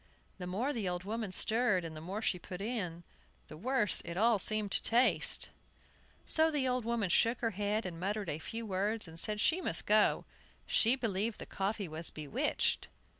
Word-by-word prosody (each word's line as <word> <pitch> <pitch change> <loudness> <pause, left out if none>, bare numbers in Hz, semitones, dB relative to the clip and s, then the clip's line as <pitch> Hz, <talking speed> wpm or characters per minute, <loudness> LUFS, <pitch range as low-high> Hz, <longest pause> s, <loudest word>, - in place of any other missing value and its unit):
The 180 - -5
more 230 +11 -1
the 215 -7 -1
old 180 0 -3
woman 215 0 -3
stirred, 215 -2 +1
and 160 -1 -6
the 155 - -7
more 195 +7 -4
she 180 - 0
put 180 0 -8
in, 195 -6 -3 0.5
the - - -8
worse 210 +1 +2
it 170 +1 -6
all 225 +1 +4
seemed 215 +1 0
to - - +2
taste. 240 +3 +3 0.8
So 320 0 +3
the 290 -4 0
old 250 -2 0
woman 230 -6 0
shook 230 +5 +3
her 230 -1 +1
head, 210 +2 -1
and 170 -2 -5
muttered 200 +2 -2
a 150 -1 -3
few 225 +7 -6
words, 205 +1 -1
and 165 0 -10
said 210 +3 -2
she 335 +11 +3
must 165 - -2
go. 210 0 +3 0.4
She 235 +3 +3
believed 220 -3 -1
the - - -7
coffee 200 0 -2
was 160 +1 +1
bewitched. 150 -3 -1
210 Hz, 190 wpm, -33 LUFS, 180-230 Hz, 0.8 s, all